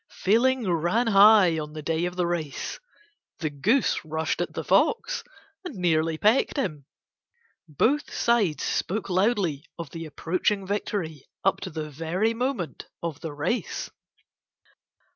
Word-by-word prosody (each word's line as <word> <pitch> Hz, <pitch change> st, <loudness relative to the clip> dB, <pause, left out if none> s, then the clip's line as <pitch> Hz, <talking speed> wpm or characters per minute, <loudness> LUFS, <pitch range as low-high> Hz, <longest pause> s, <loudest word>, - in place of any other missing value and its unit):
Feeling 235 Hz, +3 st, +3 dB
ran 175 Hz, +7 st, +1 dB
high 200 Hz, -5 st, +6 dB
on 150 Hz, 0 st, -6 dB
the 155 Hz, -1 st, -7 dB
day 165 Hz, +2 st, 0 dB
of 180 Hz, 0 st, -4 dB
the 180 Hz, -1 st, +1 dB
race; 165 Hz, -5 st, -3 dB, 0.6 s
the 155 Hz, -3 st, -2 dB
goose 210 Hz, -, +1 dB
rushed 160 Hz, 0 st, -2 dB
at -, -, -2 dB
the -, -, -4 dB
fox -, -, +2 dB, 0.4 s
and 355 Hz, -9 st, -7 dB
nearly 165 Hz, -3 st, +1 dB
pecked 220 Hz, -, +2 dB
him. 155 Hz, -, -2 dB, 0.8 s
Both 240 Hz, -, +1 dB
sides 220 Hz, -10 st, +1 dB
spoke 200 Hz, 0 st, -2 dB
loudly 185 Hz, -, +1 dB
of 165 Hz, -4 st, -7 dB
the 165 Hz, -1 st, -6 dB
approaching 185 Hz, +6 st, -1 dB
victory 185 Hz, -7 st, -3 dB, 0.2 s
up 195 Hz, -, +2 dB
to 190 Hz, -, -4 dB
the 155 Hz, -2 st, -5 dB
very 170 Hz, +9 st, 0 dB
moment 230 Hz, -, -3 dB, 0.2 s
of 165 Hz, -4 st, -3 dB
the 160 Hz, -, -5 dB
race. 145 Hz, +12 st, -2 dB
180 Hz, 140 wpm, -26 LUFS, 160-220 Hz, 0.8 s, high